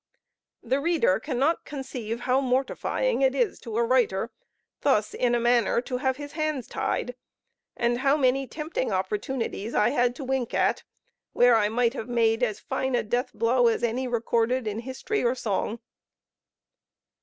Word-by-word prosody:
The 265 - 0
reader 345 - +2
cannot 290 +3 0
conceive 250 -5 -5
how 260 +2 +2
mortifying 270 - 0
it 265 0 +3
is 250 -3 0
to 225 -2 -5
a 235 - +3
writer 235 -3 +1 0.5
thus 215 -7 +1
in 240 -1 +1
a - - +2
manner 235 -1 +3
to 250 0 -4
have 260 0 0
his 290 0 -7
hands 310 -5 -2
tied, 250 - -2 0.6
and 240 0 +1
how 275 +2 +3
many 270 -1 +2
tempting 300 -3 -3
opportunities 210 +3 -2
I 210 - +4
had 245 -2 +1
to 280 - -7
wink 260 -2 -2
at, - - +2 0.5
where 245 -1 +5
I 210 -2 +3
might 235 +1 +1
have 245 -3 -6
made 225 -1 +2
as 215 -4 0
fine 265 -1 -2
a - - +1
death 245 +4 -1
blow 240 +1 +2
as 230 - +1
any 245 +3 0
recorded 235 +1 0
in 215 0 -3
history 260 - -3
or 240 +1 +2
song. 220 -1 -2
245 Hz, 165 wpm, -26 LUFS, 230-265 Hz, 0.6 s, where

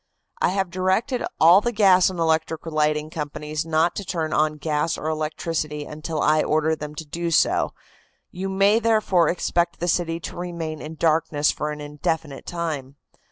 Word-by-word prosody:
"I - - +4
have 190 -1 -1
directed 190 +8 0 0.2
all 170 +6 +7
the 240 - -1
gas 195 -5 +5
and 185 - -7
electric 160 -1 0
lighting 155 -1 0
companies 150 +1 -4
not 165 +2 +2
to 200 - -3
turn 165 -4 -2
on 155 0 +1
gas 150 +1 -1
or - - -7
electricity 155 -1 -2
until 155 +1 -4
I 155 +1 +4
order 155 +1 +1
them 150 -1 -7
to 160 - -6
do 170 +3 -3
so. 165 - +2 0.6
You 190 +2 -4
may, 200 +3 +3
therefore, 215 -7 +3
expect 170 -1 0
the 175 - -2
city 165 -1 0
to - - -7
remain 170 -3 -5
in 155 +1 -7
darkness 155 -2 +2
for 150 - -3
an 150 0 -5
indefinite 150 0 -3
time. 155 -6 -4
160 Hz, 170 wpm, -23 LUFS, 150-175 Hz, 0.6 s, all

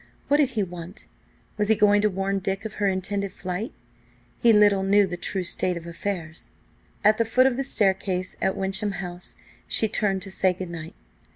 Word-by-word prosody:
What 290 - +5
did 290 -4 +3
he 210 - +3
want? 175 0 -7 0.5
Was 210 - +2
he 220 - +4
going 205 -1 +4
to 210 - +3
warn 195 +1 -1
Dick 195 +2 -3
of 220 - -5
her 200 - +3
intended 195 +1 -1
flight? 185 +4 -4 0.7
He 235 - +5
little 205 -2 +5
knew 200 +1 +4
the 180 -2 -4
true 185 +2 -2
state 180 0 -1
of 170 - -8
affairs! 170 -2 -5 0.5
At 215 +1 +4
the - - +5
foot 250 +3 +3
of 265 -2 +3
the 270 - -1
staircase 190 -6 0
at 190 - 0
Wyncham 195 +1 0
House 175 -1 -7 0.3
she 220 - +3
turned 195 -3 0
to 195 - -8
say 185 -1 +2
good 180 -1 -7
night. 165 -1 -8
195 Hz, 195 wpm, -25 LUFS, 185-210 Hz, 0.7 s, What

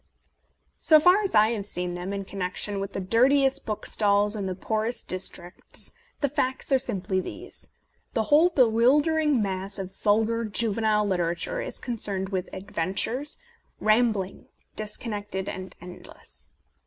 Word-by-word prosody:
So 310 -1 +6
far 360 +6 +5
as 400 - -2
I 215 +1 +6
have 210 -4 -2
seen 180 -2 -2
them, 180 +2 -5
in 200 -1 -4
connection 195 +2 -2
with 195 0 -5
the - - -3
dirtiest 265 +7 +2
book 215 -1 -4
stalls 205 0 +2
in 200 -2 -3
the 185 - -3
poorest 220 +4 -2
districts, 180 -1 -3 0.3
the 285 - +3
facts 260 0 -2
are 265 - +5
simply 195 -6 -2
these: - - -7 0.5
The 225 - +2
whole 300 +9 +5
bewildering 280 +1 +3
mass 195 +1 -2
of 190 -1 -6
vulgar 225 +2 +1
juvenile 215 -1 +1
literature 175 - -1
is - - -3
concerned 200 -6 +2
with 190 -1 -3
adventures, 195 - -1 0.4
rambling, 215 -3 +1 0.3
disconnected 210 -3 -4
and 185 0 -6
endless. 180 +1 -12
210 Hz, 140 wpm, -26 LUFS, 190-245 Hz, 0.5 s, So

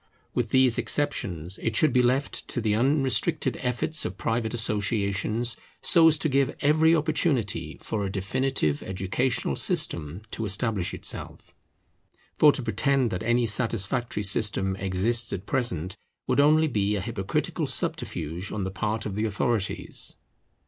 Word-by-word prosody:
With 120 -3 -1
these 130 -2 +3
exceptions 90 - -1
it 115 - -1
should 150 +2 +3
be 125 - +4
left 130 +3 0
to - - -3
the 110 -2 0
unrestricted 135 +4 +1
efforts 125 +5 0
of 95 - -5
private 115 +1 -1
associations, 105 +1 0 0.3
so 165 -1 +5
as 160 -1 +5
to 155 - -1
give 135 -1 +1
every 160 +3 +4
opportunity 130 - -1
for 105 -2 -2
a 95 - -3
definitive 100 - -1
educational 95 +7 -2
system 85 +5 0
to 115 - -4
establish 100 -2 -1
itself. - - -5 0.9
For 150 - +8
to 135 - -3
pretend 130 +1 +1
that 90 - -3
any 120 +1 +1
satisfactory 115 0 +1
system 95 -1 +3
exists 100 +5 0
at 95 +1 -5
present 95 - 0 0.3
would - - 0
only 155 +2 +5
be 105 -6 0
a 100 - -2
hypocritical 95 -2 -2
subterfuge 85 +4 -1
on 105 - -3
the 95 - -3
part 105 +3 -3
of 100 - -4
the 105 +3 -1
authorities. 110 -1 -2
115 Hz, 145 wpm, -26 LUFS, 100-130 Hz, 0.9 s, For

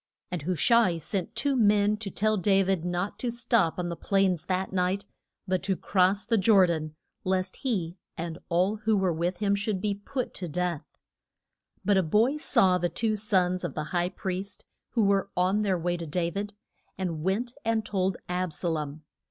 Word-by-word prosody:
And 180 -3 -2
Hu 180 +5 -1
sha 235 +8 +5
i 170 -4 0
sent 190 +6 -3
two 275 +6 +1
young 250 -6 +3
men 210 0 +3
to 210 -2 -5
tell 215 +3 +1
Da 195 0 +3
vid 190 -3 0
not 180 +3 -2
to 245 - -1
stop 235 -7 +1
on 175 -1 -2
the 170 - -3
plains 190 -3 +1
that 190 0 -1
night, 185 +2 0 0.4
but 185 0 0
to 195 0 0
cross 190 +1 +2
the 230 -3 +2
Jor 195 -1 +6
dan, 155 -3 -2 0.3
lest 185 0 -1
he 185 -9 -2 0.2
and 165 0 -5
all 185 +5 +2
who 215 0 +1
were 190 -3 +1
with 175 +3 -1
him 200 +1 +1
should 200 -1 -1
be 205 +1 0
put 250 +6 -4
to 180 - -5
death. 170 -2 -2 1.0
But 205 0 +4
a - - +5
boy 220 - +2
saw 185 -11 +3
the 175 0 0
two 220 +2 0
sons 185 -4 +1
of - - -4
the 155 - -2
high 175 0 +1
priest 190 +1 -5 0.3
who 230 - +3
were 200 0 +2
on 185 +4 +2
their 195 -3 +1
way 175 +1 -1
to 170 -1 -6
Da 170 +2 -1
vid, 205 +2 -4 0.4
and 170 -5 -3
went 210 +8 -1
and 225 -1 0
told 190 -2 0
Ab 180 -2 -2
sa 175 - -2
lom. 155 -1 -3
190 Hz, 200 wpm, -28 LUFS, 175-210 Hz, 1.0 s, Jor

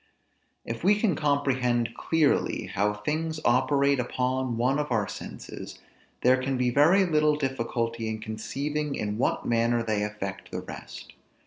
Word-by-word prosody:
If 115 +5 -5
we 205 +3 +4
can 205 -7 +2
comprehend 130 -5 +1
clearly 160 -3 +1
how 105 +2 +2
things 155 +9 -2
operate 140 +2 +3
upon 125 0 -1
one 130 +5 +2
of 150 -2 -2
our 110 -3 +1
senses, - - -8 0.4
there 130 +1 +4
can 130 0 -1
be 125 -1 +1
very 165 +9 +5
little 155 -3 +3
difficulty 115 -4 -2
in 110 - -2
conceiving 140 +7 -3
in 105 +1 -3
what - - 0
manner 115 0 +2
they 110 -2 0
affect 105 -2 -5
the - - -4
rest. - - -10
130 Hz, 145 wpm, -27 LUFS, 115-150 Hz, 0.4 s, very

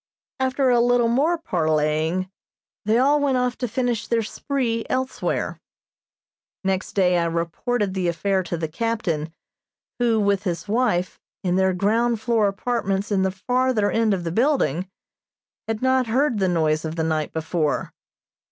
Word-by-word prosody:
After 260 0 +2
a 240 - +4
little 240 0 +3
more 295 +9 +2
parleying 160 - 0 0.5
they 220 +2 +3
all 285 +4 +4
went 280 -3 +1
off 250 0 0
to 245 - -1
finish 240 -1 -1
their 230 -1 +1
"spree" 230 0 -2
elsewhere. 260 0 -2 1.0
Next 190 0 -1
day 180 -3 +3
I 170 - +1
reported 170 +6 -1
the 185 -2 -1
affair 190 +3 0
to 175 -1 -4
the 160 0 -2
captain, 170 -4 -2 0.7
who, 235 -2 +2
with 200 -2 +2
his 180 -2 -3
wife, 210 -5 0 0.2
in 180 -1 +1
their 190 0 +3
ground 225 +5 +1
floor 225 -3 +2
apartments 200 -1 -1
in 195 -2 +2
the 190 - +2
farther 245 +2 0
end 225 -3 +2
of 180 - -5
the 165 - -3
building, 195 - +1 0.8
had 225 +1 -3
not 260 -1 +2
heard 245 0 +1
the 190 - +2
noise 155 -3 +1
of 160 0 -4
the 165 - -1
night 155 -2 -1
before. 160 -1 -1
205 Hz, 155 wpm, -23 LUFS, 175-245 Hz, 1.0 s, a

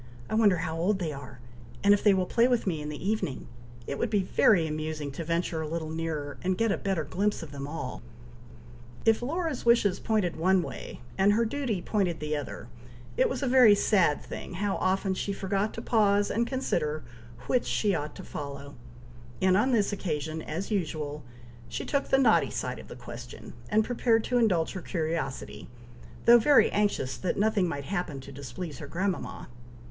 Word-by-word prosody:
I - - -1
wonder 210 -4 +4
how 165 -1 -3
old 190 +4 +2
they 165 -5 -3
are, 140 -2 -10 0.4
and 200 0 +7
if 205 - +1
they 205 -2 +6
will 185 -1 +1
play 235 +5 +3
with 245 -2 +1
me 165 -6 -1
in 150 - -5
the 150 +5 -5
evening! 210 -10 -2 0.4
It 140 - -4
would 235 - 0
be 205 -3 +2
very 180 -2 +4
amusing 155 -1 -3
to 155 +5 -5
venture 165 0 -1
a 155 - -3
little 160 0 -4
nearer, 160 -3 -4
and 185 0 0
get 225 -2 +2
a - - +1
better 190 -5 -1
glimpse 200 +3 -1
of 155 - -9
them 140 -1 -6
all!" 145 -4 -5 1.0
If 225 0 +4
Laura's 315 +2 -2
wishes 220 -5 +3
pointed 205 -7 0
one 185 +2 +3
way - - -8 0.2
and 200 +2 +5
her 230 +2 +2
duty 230 -7 -2
pointed 185 -6 0
the 150 0 -2
other, 145 -4 -6 0.5
it - - +3
was 260 +1 -3
a - - +1
very 245 -5 +7
sad 190 -7 +2
thing - - -7
how 200 +2 -1
often 190 +1 +1
she 200 +1 -2
forgot 195 +2 -1
to 230 - -6
pause 205 -3 +3
and 235 +2 +1
consider 155 - -1 0.4
which 250 - +1
she 205 -2 +1
ought 150 -3 -3
to - - -9
follow; 140 0 -7 0.7
and 185 0 +4
on 230 +7 +3
this 210 -4 +2
occasion, 160 -4 -3
as 170 +8 -5
usual, 155 -6 -2 0.5
she - - -4
took 280 -1 -1
the 270 - +5
naughty 250 -5 +4
side - - -4
of - - -11
the - - -9
question, - - -9 0.2
and 215 +1 +3
prepared 230 -2 +2
to 245 - +1
indulge 185 -8 +2
her 190 - -5
curiosity, 160 -6 -3 0.6
though 240 0 +9
very 230 -2 +5
anxious 205 -11 0
that 185 - -2
nothing 205 -2 +2
might 140 -4 -4
happen 175 -6 -3
to 135 +1 -10
displease 140 +3 -7
her 145 - -7
grandmama. 185 +4 -3
185 Hz, 195 wpm, -28 LUFS, 155-215 Hz, 1.0 s, though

